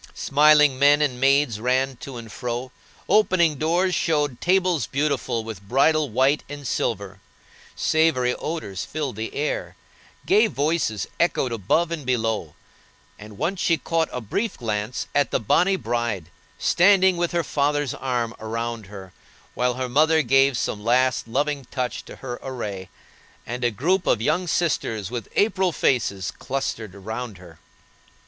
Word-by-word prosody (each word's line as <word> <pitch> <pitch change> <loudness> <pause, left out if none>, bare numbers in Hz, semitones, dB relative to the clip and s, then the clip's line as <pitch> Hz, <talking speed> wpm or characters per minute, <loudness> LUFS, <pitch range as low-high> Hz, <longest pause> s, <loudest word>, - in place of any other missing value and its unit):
Smiling 150 -1 +4
men 145 +1 +6
and 135 -5 0
maids 135 -4 +3
ran 130 +3 0
to 135 0 -8
and 115 -2 -9
fro; 125 +3 -4 0.4
opening 170 -8 +3
doors 175 +4 +1
showed 150 -8 0
tables 180 -3 +2
beautiful 140 -5 -1
with 110 -4 -7
bridal 140 +7 +2
white 130 +6 +2
and 145 -1 -8
silver; 100 -4 -2 0.6
savory 155 -6 +2
odors 125 - -4
filled 145 -6 -4
the 110 +1 -5
air; 150 +2 -2 0.5
gay 410 +3 +4
voices 145 - -1
echoed 150 -7 +1
above 115 - 0
and 165 -3 -4
below; 115 - -1 0.6
and 105 -1 -11
once 185 - -2
she 165 - +3
caught 165 -1 -1
a 125 - -3
brief 200 - -3
glance 110 0 -3
at 145 -1 +2
the - - 0
bonny 180 - +3
bride, 115 - -3 0.3
standing 190 0 +4
with 175 0 -1
her 170 -1 0
father's 145 -2 0
arm 120 -3 -2
about 115 -1 -4
her, 95 -2 -11 0.4
while 125 0 0
her 130 0 -2
mother 155 +5 +3
gave 135 +1 +3
some 105 -3 -3
last, 125 +1 +2
loving 140 +3 -1
touch 125 -1 -3
to - - -10
her 125 -2 -7
array; 105 -8 -6 0.6
and 120 +2 -5
a 120 - +3
group 175 - 0
of 115 - +3
young 155 +10 0
sisters 115 - -1
with 120 -4 -4
April 190 -3 +2
faces 100 - 0
clustered 110 -7 -4
round 110 +2 -6
her. 85 -3 -15
130 Hz, 150 wpm, -23 LUFS, 115-155 Hz, 0.6 s, men